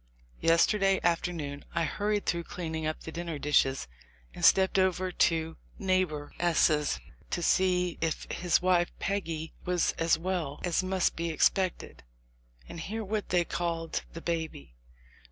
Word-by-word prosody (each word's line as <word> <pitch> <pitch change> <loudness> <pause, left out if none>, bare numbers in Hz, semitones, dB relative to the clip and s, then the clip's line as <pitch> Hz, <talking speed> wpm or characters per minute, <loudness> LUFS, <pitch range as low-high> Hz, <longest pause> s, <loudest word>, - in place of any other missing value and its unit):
Yesterday 195 +4 +3
afternoon 165 -4 -1
I 170 - +2
hurried 205 +6 -1
through 170 -1 -1
cleaning 160 -3 -4
up 155 - -3
the 160 - -7
dinner 170 -1 -4
dishes 140 - +2 0.5
and - - -9
stepped 190 0 +5
over 185 0 +1
to 165 -2 +1 0.2
neighbor 185 -6 0
S.... 155 - +2 0.3
to 175 - -2
see 180 -1 +2
if 165 -1 -1
his 175 -1 +1
wife 180 -1 +3
Peggy 165 -5 -3
was 180 -1 +1
as 165 0 +3
well 170 -5 -3
as 175 -1 +1
mout 185 -1 +1
be 170 0 -2
expected, 185 +3 0 0.7
and 170 - -8
hear 220 +7 -4
what 210 +1 -3
they 175 -1 +2
called 165 -2 -2
the 165 - -7
baby. 160 - -4
170 Hz, 140 wpm, -29 LUFS, 160-185 Hz, 0.7 s, stepped